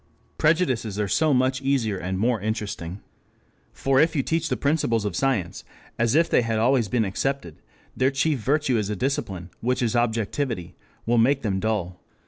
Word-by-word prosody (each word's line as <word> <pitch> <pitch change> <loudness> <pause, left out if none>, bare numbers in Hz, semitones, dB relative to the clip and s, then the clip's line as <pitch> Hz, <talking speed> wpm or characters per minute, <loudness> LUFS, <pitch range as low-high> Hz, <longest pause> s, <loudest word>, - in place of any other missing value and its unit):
Prejudices 130 - +1
are 105 - 0
so 155 +9 +2
much 130 0 +2
easier 135 -7 0
and 95 +1 -3
more 115 +1 +1
interesting. 100 -4 -4 0.7
For 135 -1 +1
if 160 +3 +3
you 140 - +1
teach 165 +2 -1
the 125 - -1
principles 140 -7 +1
of 100 -4 -2
science 110 -7 -1 0.4
as 120 +2 +2
if 165 +1 +4
they 160 - +3
had 115 -1 -1
always 120 0 +2
been 110 +2 +1
accepted, 100 - -3 0.3
their 130 - +3
chief 140 +1 0
virtue 135 0 +1
as 105 -1 -2
a 105 - -1
discipline, 95 -7 -3
which 125 +2 0
is 115 0 0
objectivity, 115 -4 -1 0.3
will 120 +1 +2
make 135 +4 +3
them 95 -4 0
dull. 95 -4 -2
120 Hz, 175 wpm, -24 LUFS, 105-135 Hz, 0.7 s, if